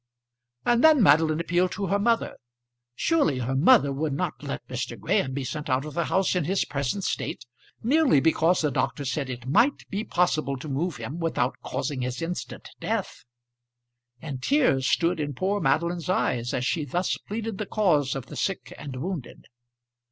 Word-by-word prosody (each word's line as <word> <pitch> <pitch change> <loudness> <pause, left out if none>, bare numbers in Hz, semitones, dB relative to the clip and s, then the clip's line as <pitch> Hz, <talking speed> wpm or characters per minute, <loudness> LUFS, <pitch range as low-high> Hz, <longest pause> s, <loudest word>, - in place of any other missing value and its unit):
And 240 0 +3
then 310 -6 +7
Madeline 155 -1 +4
appealed 175 +2 +1
to 200 - -3
her 200 +2 +1
mother. 230 +2 +1 0.6
Surely 295 - +2
her 125 +1 -2
mother 145 - +5
would 150 +1 -2
not - - -3
let - - -6
Mr. - - -4
Graham 130 - +1
be 135 +1 -3
sent 150 +3 -5
out 130 +2 +1
of 150 - -7
the 170 -1 0
house 190 0 +1
in 180 -4 +1
his 190 +4 +1
present 140 +7 -2
state, - - -3 0.4
merely 275 - +4
because 165 +3 +3
the 150 -2 +1
doctor 140 +2 -1
said 135 +1 -2
it 125 -1 -6
might 235 - +2
be 200 +2 -2
possible 160 -8 0
to 130 - -8
move 150 +4 -2
him 155 +6 -6
without 150 -6 0
causing 140 -4 -3
his 125 0 -3
instant 170 +2 -5
death! - - -3 0.9
And 135 -3 -6
tears 140 - +2
stood 170 0 +2
in 145 -2 -3
poor 195 +7 0
Madeline's 170 +1 0
eyes 120 -9 0
as 125 - -1
she 155 +3 0
thus 175 +6 -1
pleaded 220 0 -5
the 215 - -3
cause 150 -11 +2
of 135 -3 -5
the - - -10
sick 195 -2 -3
and 140 -3 -7
wounded. 160 +1 -5
160 Hz, 180 wpm, -26 LUFS, 135-195 Hz, 0.9 s, then